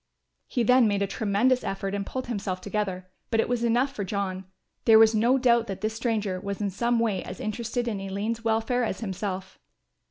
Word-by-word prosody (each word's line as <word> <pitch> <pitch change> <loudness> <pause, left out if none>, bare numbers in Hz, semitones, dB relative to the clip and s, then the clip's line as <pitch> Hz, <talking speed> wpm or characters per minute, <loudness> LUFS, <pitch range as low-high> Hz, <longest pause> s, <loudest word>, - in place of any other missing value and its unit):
He 245 - 0
then 250 0 +5
made 200 -1 +1
a - - +2
tremendous 220 +6 +1
effort 195 0 -3
and 200 0 -1
pulled 260 +5 -5
himself 200 -5 -3
together, 190 -2 -3 0.2
but 225 - +1
it - - +2
was 245 -1 -1
enough 245 +4 +2
for 210 - -3
John, 190 -1 -3 0.4
there 220 -1 +8
was 220 0 +7
no 235 +5 +3
doubt 235 -2 +3
that 195 -1 -5
this 215 +1 -1
stranger 220 -5 -1
was 200 +1 -5
in 205 -2 -1
some 235 +5 +1
way 220 -5 0
as 185 - -8
interested 235 +3 -3
in 210 -4 -2
Aline's 205 +4 -3
welfare 225 +2 +1
as 205 -3 -3
himself. 190 -2 -4
215 Hz, 200 wpm, -26 LUFS, 195-235 Hz, 0.4 s, there